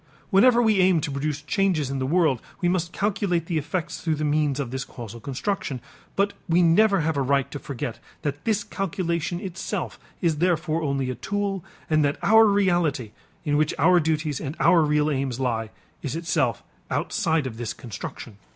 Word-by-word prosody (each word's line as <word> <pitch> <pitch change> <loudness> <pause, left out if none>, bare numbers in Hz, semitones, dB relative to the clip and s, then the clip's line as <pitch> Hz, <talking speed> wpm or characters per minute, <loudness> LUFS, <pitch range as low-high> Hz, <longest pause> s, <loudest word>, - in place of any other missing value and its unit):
Whenever 240 +5 +6
we 215 -3 +3
aim 185 -2 +4
to 145 - -3
produce 145 +1 -2
changes 160 -4 +1
in 135 - -2
the 130 - -1
world, 155 -6 +2 0.2
we 180 - +1
must 175 -1 0
calculate 195 -5 0
the 165 -2 0
effects 160 +3 -4
through 160 -2 0
the 155 - -3
means 150 -2 +1
of 130 -4 -3
this 130 +1 -3
causal 115 -3 -9
construction, 140 - -3 0.4
but 200 +1 +1 0.2
we 175 +2 +4
never 195 +3 +4
have 160 -1 0
a - - +2
right 140 0 +1
to 145 - -5
forget 125 -5 -5 0.2
that 145 0 -3
this 210 -2 +1
calculation 175 -3 -2
itself 190 -3 -4 0.2
is 165 -4 +1
therefore 165 -2 +1
only 135 -4 -1
a - - -2
tool 195 - -2 0.2
and 155 -1 +3
that 145 0 +1
our 220 +1 +7
reality, 175 - +1 0.3
in 145 -1 +2
which 155 0 +1
our 175 +5 +5
duties 155 -3 -1
and 145 +1 -4
our 170 - +5
real 150 0 +2
aims 135 -3 -2
lie, 115 -4 -1 0.3
is 140 +1 -3
itself 165 0 0 0.3
outside 160 - 0
of 115 -4 -5
this 120 -1 -3
construction. 115 -2 -8
155 Hz, 185 wpm, -25 LUFS, 140-180 Hz, 0.4 s, our